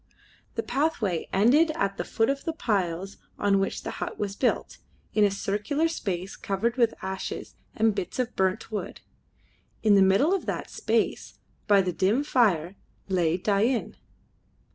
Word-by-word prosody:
The - - -1
pathway 235 - -1
ended 255 - +4
at 195 0 -1
the - - -2
foot 225 +4 +1
of 275 0 -4
the 325 - -2
piles 195 - -1 0.2
on 200 -1 +2
which 195 - -2
the - - -4
hut - - -4
was 200 -1 -3
built, 250 - -1 0.3
in 210 - +4
a 205 - +5
circular 210 +10 -1
space 195 - -4
covered 215 +4 -1
with 235 -3 +2
ashes 190 0 -5 0.2
and 220 0 +3
bits 195 -3 -4
of 250 -1 -2
burnt 190 +3 0
wood. 210 - -5 0.8
In 215 -2 +5
the 200 - +6
middle 195 - +4
of 390 - -2
that - - -3
space, - - -1 0.3
by 200 -2 +5
the 180 -1 -2
dim 200 - +2
fire, 200 - +2 0.3
lay 175 -3 +2
Dain. 215 +6 +1
205 Hz, 160 wpm, -27 LUFS, 190-240 Hz, 0.8 s, the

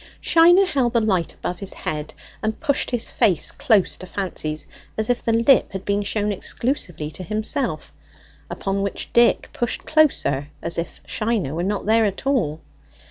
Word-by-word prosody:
Shiner 350 +3 +6
held 265 -9 0
the 235 - +4
light 190 -6 0
above 180 0 -5
his 195 - -5
head 150 0 -4 0.3
and 220 0 -2
pushed 285 -4 0
his 245 -3 -2
face 200 -9 +2
close 220 -9 +2
to 185 - -9
Fancy's, 155 -6 -3 0.3
as 220 +2 +1
if 245 - -2
the 230 - +1
lip 230 +2 +4
had 190 0 -5
been 200 0 +1
shown 205 +1 -1
exclusively 185 - -3
to 185 - -8
himself, 215 - -1 0.6
upon 195 0 -2
which 200 0 -4
Dick 235 0 +4
pushed 240 - -2
closer, 275 - +2
as 170 0 -2
if 170 - -6
Shiner 215 - -1
were 165 - -2
not 200 +3 -2
there 220 +1 +4
at 200 +5 -3
all. 185 - 0
210 Hz, 170 wpm, -22 LUFS, 180-240 Hz, 0.6 s, Shiner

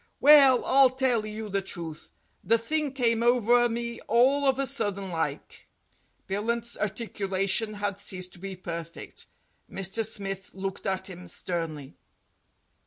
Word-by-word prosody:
Well, 275 -4 +7
I'll 270 0 +6
tell 250 -4 0
you 215 0 -6
the 200 -1 -1
truth. 165 -5 -7 0.3
The 230 - +3
thing 295 +5 -1
came 230 -4 +1
over 240 0 +4
me 235 0 -4
all 270 +5 +4
of 265 -1 +3
a 275 - 0
sudden 205 -8 -2
like." 160 -3 -4 0.6
Billunt's 230 +4 -1
articulation 205 0 -1
had 205 -1 -3
ceased 185 -3 -4
to - - -15
be 195 +1 -6
perfect. 170 -2 -7 0.4
Mr. 195 +4 0
Smith 195 -4 -5
looked 195 0 -5
at 190 0 -2
him 180 -1 -10
sternly. 165 -5 -4
210 Hz, 135 wpm, -27 LUFS, 190-240 Hz, 0.6 s, Well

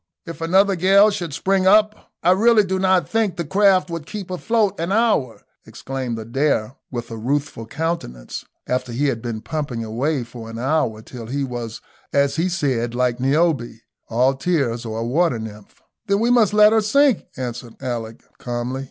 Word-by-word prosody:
"If 165 0 -8
another 190 +4 +3
gale 195 +4 +5
should 175 -5 -4
spring 190 +6 +1
up, 215 +2 +3
I 175 - +5
really 215 +3 +5
do 190 -1 -2
not 185 -1 +2
think 220 -5 0
the 170 -2 -3
craft 190 +1 +3
would 165 -3 -5
keep 200 -4 -7
afloat 205 +1 0
an 170 +3 -2
hour," 210 - +1 0.2
exclaimed 130 -3 -5
Adair, 120 +1 -1
with 120 -2 -6
a 115 - -5
ruthful 135 -1 -2
countenance, 145 - -4 0.2
after 125 -1 -2
he 140 +4 +1
had 115 -4 -3
been 115 -2 -4
pumping 140 -7 -4
away 125 +5 -1
for 115 -1 -10
an 115 - -7
hour, 120 -4 0
till 120 -2 -9
he 140 +3 -2
was, 120 -3 -5 0.3
as 140 +1 +1
he 170 +3 +1
said, 130 -9 -1
like 125 -1 0
Niobe, 135 -3 +1 0.3
all 125 +4 +3
tears, 135 -6 -1
or 110 0 -4
a - - -2
water 155 +2 +1
nymph. 105 -2 -10 0.3
"Then 200 0 +2
we 235 +2 +2
must 230 -5 +4
let 210 +1 +6
her 220 - +4
sink," 270 +2 +3
answered 120 -2 -6
Alick, 115 -3 -5 0.2
calmly. 120 +2 -3
140 Hz, 180 wpm, -21 LUFS, 120-190 Hz, 0.3 s, let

